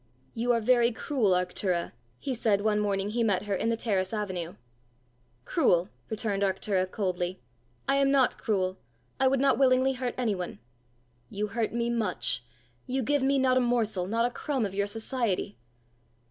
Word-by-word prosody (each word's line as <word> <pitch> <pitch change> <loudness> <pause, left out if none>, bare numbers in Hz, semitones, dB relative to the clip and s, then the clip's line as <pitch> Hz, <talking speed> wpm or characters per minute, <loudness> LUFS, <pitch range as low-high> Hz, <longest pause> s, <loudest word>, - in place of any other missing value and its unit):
"You 240 +2 0
are 235 - +3
very 240 +1 +4
cruel, 225 -4 +1
Arctura," 180 -1 0 0.3
he 275 - -3
said 215 -4 +1
one 210 0 +2
morning 200 -1 0
he 235 +2 -1
met 200 -4 +2
her 205 -1 -2
in 210 +4 0
the 230 - 0
terrace 195 -5 0
avenue. 185 -5 -4 0.9
"Cruel?" 185 - +2 0.2
returned 215 -3 -1
Arctura 190 -1 0
coldly; 185 -2 -2 0.5
"I 275 - +3
am 275 0 +3
not 270 -2 +3
cruel. 190 -3 -1 0.4
I 265 - +4
would 265 0 +2
not 275 0 +3
willingly 260 0 +4
hurt 250 -1 -3
anyone." 200 - -2 0.7
"You 210 +1 -3
hurt 225 +1 -1
me 235 0 -1
much; 210 - 0 0.4
you 260 +1 -1
give 290 +4 +1
me 275 +1 +2
not 260 -1 +3
a - - +4
morsel, 225 -7 0
not 230 +3 +1
a 245 - 0
crumb 270 -4 -1
of 195 - -5
your 200 +1 0
society!" 220 -2 -2
220 Hz, 170 wpm, -28 LUFS, 195-250 Hz, 0.9 s, very